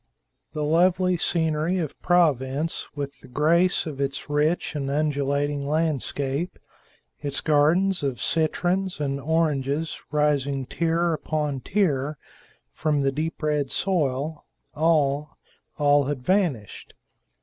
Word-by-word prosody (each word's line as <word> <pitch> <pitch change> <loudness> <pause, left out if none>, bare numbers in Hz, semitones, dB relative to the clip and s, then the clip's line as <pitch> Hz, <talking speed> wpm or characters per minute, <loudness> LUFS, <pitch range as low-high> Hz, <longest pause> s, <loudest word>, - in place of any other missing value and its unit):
The 150 - -2
lovely 180 +4 +3
scenery 160 0 0
of 160 -6 -4
Provence, 150 -3 +1
with 140 -1 -5
the - - -15
grace 165 +7 +2
of 145 -4 -5
its 140 +1 -3
rich 150 +5 +1
and 140 -2 -2
undulating 145 0 0
landscape; 145 0 -1 0.6
its 145 -1 -2
gardens 170 +6 +3
of 135 -4 -2
citrons 175 +3 0
and 140 -1 -1
oranges 155 -1 0
rising 140 -2 +1
tier 170 +3 0
upon 150 -3 -2
tier 150 -5 0 0.5
from 150 -3 0
the 135 - +2
deep 155 +3 -4
red 150 -3 0
soil 150 -4 -1 0.3
all, 150 -2 +1 0.4
all 145 -1 +4
had 135 -2 -3
vanished. 165 - -1
150 Hz, 115 wpm, -25 LUFS, 140-165 Hz, 0.6 s, all